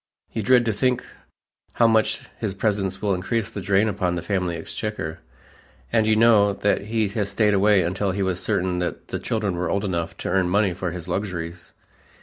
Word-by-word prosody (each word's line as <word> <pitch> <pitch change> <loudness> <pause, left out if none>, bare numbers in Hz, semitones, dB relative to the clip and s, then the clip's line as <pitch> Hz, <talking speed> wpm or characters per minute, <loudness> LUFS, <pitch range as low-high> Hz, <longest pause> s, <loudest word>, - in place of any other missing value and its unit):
You 110 - -1
dread 120 +3 +4
to 110 - +1
think 125 +4 0 0.7
how 120 - +3
much 110 -1 +3 0.2
his 105 -4 -2
presence 100 -2 -1
will 100 -2 +2
increase 110 +4 -1
the 100 - -5
drain 100 +3 +2
upon 95 -4 -1
the 85 - -4
family 90 -4 -1
exchequer, 85 -2 -4 0.7
and 110 -2 +3
you 110 - +4
know 110 -3 +5
that 100 0 0
he 110 0 0 0.2
stayed 105 +1 +1
away 100 -1 +4
until 95 +4 -1
he 95 +1 -1
was 95 -1 -1
certain 90 -1 0
that 90 - -4
the - - -3
children 105 -5 -1
were 90 - -1
old 100 +1 0
enough 85 -4 -3
to - - 0
earn 95 -2 +2
money 100 0 +2
for 90 0 -3
his 85 0 -6
luxuries. 90 -3 -4
100 Hz, 190 wpm, -23 LUFS, 90-110 Hz, 0.7 s, know